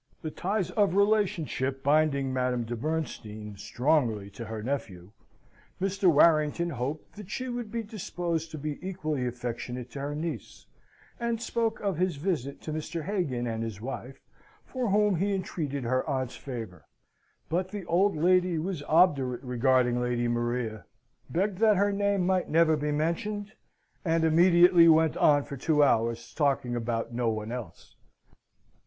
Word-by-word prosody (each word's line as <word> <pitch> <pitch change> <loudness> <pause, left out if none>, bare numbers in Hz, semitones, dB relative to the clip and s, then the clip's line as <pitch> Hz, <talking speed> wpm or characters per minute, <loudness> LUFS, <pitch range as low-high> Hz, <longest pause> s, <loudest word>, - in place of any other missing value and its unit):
The 155 - -3
ties 195 +3 -2
of 200 -4 +2
relationship 190 -10 +1
binding 140 -2 +2
Madame 125 -1 0
de 120 +1 -4
Bernstein 110 -7 -4
strongly 120 -4 0
to 105 +4 -8
her 110 -1 -6
nephew, 100 -8 -4 0.7
Mr. 195 -1 +2
Warrington 160 +2 +3
hoped 140 - -5
that 210 -3 -9
she 255 +4 -4
would 240 -3 -4
be 230 -1 -2
disposed 175 -6 -3
to 155 - -7
be 150 0 -4
equally 155 -8 -2
affectionate 125 0 -5
to 140 - -7
her 145 +1 -3
niece; 155 - -5 0.5
and 235 -1 -1
spoke 230 -1 -1
of 195 -5 -1
his 185 -2 +1
visit 140 -4 -3
to 155 - -4
Mr. 155 +1 -4
Hagan 165 -11 -1
and 115 -1 -3
his 110 -3 -5
wife, 130 +2 -7 0.5
for 255 -4 -2
whom 205 -1 +3
he 200 +3 +1
entreated 150 -7 -3
her 130 +2 +1
aunt's 130 -3 -2
favour. 115 - -8 0.6
But 180 +3 -1
the 200 -2 -6
old 185 +3 +2
lady 180 +2 +3
was 170 0 -3
obdurate 140 -7 +3
regarding 125 -1 +2
Lady 120 -1 0
Maria; 120 -2 -2 0.5
begged 190 +2 -1
that 215 -3 +5
her 205 +1 +3
name 200 -2 +1
might 185 -1 +1
never 160 0 +4
be 150 0 -2
mentioned, 200 +8 -2 0.5
and 165 -1 +1
immediately 170 +1 +6
went 160 -1 +5
on 145 -1 +4
for 140 - -7
two 150 +3 +3
hours 115 -3 +1
talking 135 -5 0
about 115 0 -2
no 120 -1 0
one 110 0 -3
else. 85 - -8
150 Hz, 155 wpm, -28 LUFS, 125-185 Hz, 0.7 s, immediately